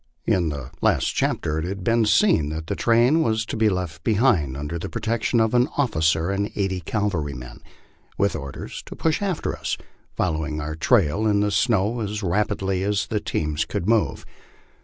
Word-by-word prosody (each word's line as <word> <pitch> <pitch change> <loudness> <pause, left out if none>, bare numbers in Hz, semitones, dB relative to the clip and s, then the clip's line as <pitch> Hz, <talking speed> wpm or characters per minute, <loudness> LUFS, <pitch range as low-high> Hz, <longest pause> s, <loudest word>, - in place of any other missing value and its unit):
In 85 -3 +2
the 70 -3 -6
last - - +2
chapter 80 0 0
it 80 - -3
has 95 +2 -3
been 115 +4 +1
seen 105 - +3
that 80 +1 -4
the - - -3
train 120 +7 +3
was 110 -4 +1
to - - -5
be 110 -1 +3
left 90 -4 -3
be 110 - +2
hind 90 - +2
under 75 +4 -4
the 95 - -5
protection 115 +1 0
of 110 +1 +2
an 125 +3 +3
officer 80 - +1
and 100 +1 -1
eighty 95 -2 -1
cavalrymen, 80 - -3 0.6
with 100 -2 +1
orders 70 -3 -6
to - - -8
pusli 160 +2 0
after 195 -5 -1
us, - - -3 0.4
following 80 -1 -1
our 75 +1 -4
trail 100 - +2
in 100 -1 +3
the 105 0 +1
snow 110 +1 +1
as 105 -1 -3
rapidly 95 0 0
as 100 0 0
the 105 - -1
teams 75 -5 -1
could 85 - -4
move. 115 -1 +1
100 Hz, 180 wpm, -23 LUFS, 80-110 Hz, 0.6 s, seen